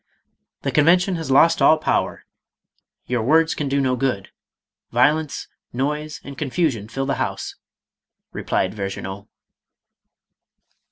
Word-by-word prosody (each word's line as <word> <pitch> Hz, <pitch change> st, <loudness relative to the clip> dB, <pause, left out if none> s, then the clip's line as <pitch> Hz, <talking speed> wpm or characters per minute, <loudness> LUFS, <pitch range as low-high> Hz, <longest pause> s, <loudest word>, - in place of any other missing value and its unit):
" -, -, -55 dB
The -, -, -1 dB
Convention 175 Hz, +5 st, +4 dB
has 160 Hz, -4 st, -5 dB
lost 165 Hz, +5 st, +5 dB
all 155 Hz, -, +6 dB
power. 155 Hz, -, -1 dB, 0.8 s
Your 125 Hz, -1 st, -1 dB
words 160 Hz, +7 st, +3 dB
can 145 Hz, -2 st, -3 dB
do 140 Hz, +1 st, +1 dB
no 130 Hz, -2 st, +1 dB
good. 125 Hz, -6 st, -2 dB, 0.6 s
Vio 125 Hz, +5 st, +5 dB
lence, 155 Hz, -2 st, -5 dB, 0.3 s
noise, 150 Hz, +4 st, -2 dB
and 140 Hz, -, -9 dB
confusion 135 Hz, -, -1 dB
fill 135 Hz, +4 st, -3 dB
the 140 Hz, -, -1 dB
House," -, -, -3 dB, 0.8 s
replied 95 Hz, -, -1 dB
Ver 100 Hz, -2 st, -3 dB
ginaud. 95 Hz, +1 st, -7 dB
140 Hz, 130 wpm, -22 LUFS, 120-155 Hz, 0.8 s, all